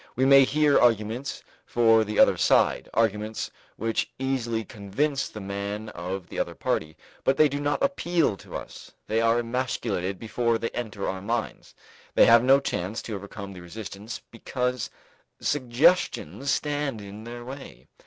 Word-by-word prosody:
We 130 - +2
may 135 0 +8
hear 150 +1 +3
arguments 115 +2 +1 0.2
for 115 -2 +4
the 105 0 -4
other - - +6
side, - - +3
arguments 110 -1 0 0.2
which 115 0 -1
easily 120 -4 -1
convince 135 +7 -1
the 110 - -8
man 100 +2 -4
of 90 +2 -5
the - - -5
other - - -2
party, 80 0 -2 0.3
but 135 - +2
they 155 - +6
do 145 0 -3
not 145 - 0
appeal 175 - +1
to - - -11
us: - - -8
they 110 +1 +1
are 115 +1 +3
emasculated 115 -6 -2
before 115 +1 0
they 115 0 -2
enter 110 -4 -4
our 95 0 -3
minds; 115 +3 -3 0.4
they - - +7
have 115 0 +7
no 135 +2 +6
chance 105 -5 -3
to 110 - -5
overcome 100 0 -8
the 90 - -10
resistance 105 +4 -7
because 125 +1 -2 0.5
suggestions 135 - +1
stand 145 -5 -1
in 100 +1 -9
their 120 +1 -8
way. 125 - -10
115 Hz, 155 wpm, -26 LUFS, 105-135 Hz, 0.5 s, may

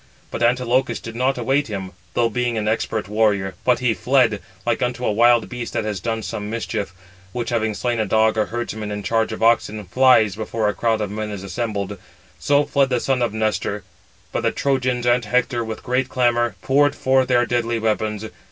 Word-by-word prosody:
But - - -5
Antilochus 125 -1 +2
did 115 0 -8
not 130 +2 +1
await 135 +4 +1
him, 95 -4 -5 0.2
though 120 - +3
being 120 +1 -1
an 105 -1 -1
expert 110 -2 -1
warrior, 105 -3 +1
but 125 -1 +3
he 120 -3 +2
fled, 125 -5 +2 0.2
like 120 -1 0
unto 125 0 -1
a - - +2
wild 120 +1 +4
beast 120 -2 -6
that - - -1
has 105 -3 -2
done 115 +3 -3
some 105 0 -5
mischief, 110 -3 -3 0.4
which, 120 -1 -3
having 110 -2 0
slain 120 0 -1
a 110 - 0
dog 110 +1 +3
or 110 -1 +1
herdsman 110 -2 -4
in 105 0 -4
charge 115 +1 0
of 110 - -4
oxen, 110 -2 +2
flies, 110 0 +4
before 110 0 -2
a 105 - +1
crowd 110 -1 0
of 105 -2 -3
men 105 0 -4
is 100 -2 -6
assembled: 100 0 -3 0.4
so 145 0 +3
fled 140 -2 +2
the 125 -2 +1
son 130 +1 0
of 120 -3 +1
Nestor; 110 0 -1 0.5
but - - -1
the - - +2
Trojans 130 -3 0
and 120 0 +3
Hector, 120 +2 0
with 110 -1 -6
great 125 +1 0
clamour, 120 -2 +1
poured 145 +1 +3
forth 130 -1 +2
their 120 -1 +3
deadly 120 -1 0
weapons. 110 -1 -1
115 Hz, 200 wpm, -21 LUFS, 110-125 Hz, 0.5 s, wild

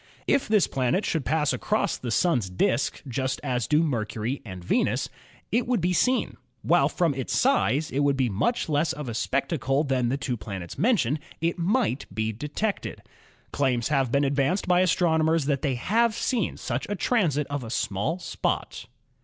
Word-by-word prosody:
If 280 - +2
this 210 -3 +4
planet 135 - 0
should 160 -5 -1
pass 150 -2 +1
across 210 -3 0
the 125 - -6
Sun's 120 - +1
disk 115 +7 0
just 130 +1 -2
as 125 -3 -1
do 150 +2 +3
Mercury 120 -2 -2
and 95 -5 -8
Venus, - - 0 0.4
it 235 +2 +1
would 245 -3 +2
be 175 +1 +1
86 180 - +2
ASTRONOMY 255 0 +2
seen. - - -15 0.3
While - - +4
from 170 -5 +1
its 130 -2 -2
size 160 - +2
it 135 - -1
would 140 -1 +2
be 130 -2 +2
much 110 - 0
less 155 +1 +1
of 150 -3 -6
a 120 - -3
spec 135 +5 -1
tacle 140 -1 0
than 130 -3 +1
the 135 - 0
two 125 -3 -3
planets 95 -5 -7
mentioned, 165 - +2 0.2
it 170 +2 -1
might 185 - 0
be 110 +3 -1
detected. 150 - -3 0.5
Claims 125 -4 0
have 135 -5 +1
been 140 +2 +2
advanced 140 +8 +1
by 180 0 +4
astronomers 165 -3 +2
that 140 -2 0
they 140 -5 0
have 220 - +1
seen 235 -6 -1
such 120 +1 -3
a 205 - -1
transit 170 - +1
of 145 -2 -2
a 115 - -7
small 105 - -1
spot. 185 - -3
145 Hz, 185 wpm, -26 LUFS, 125-180 Hz, 0.5 s, this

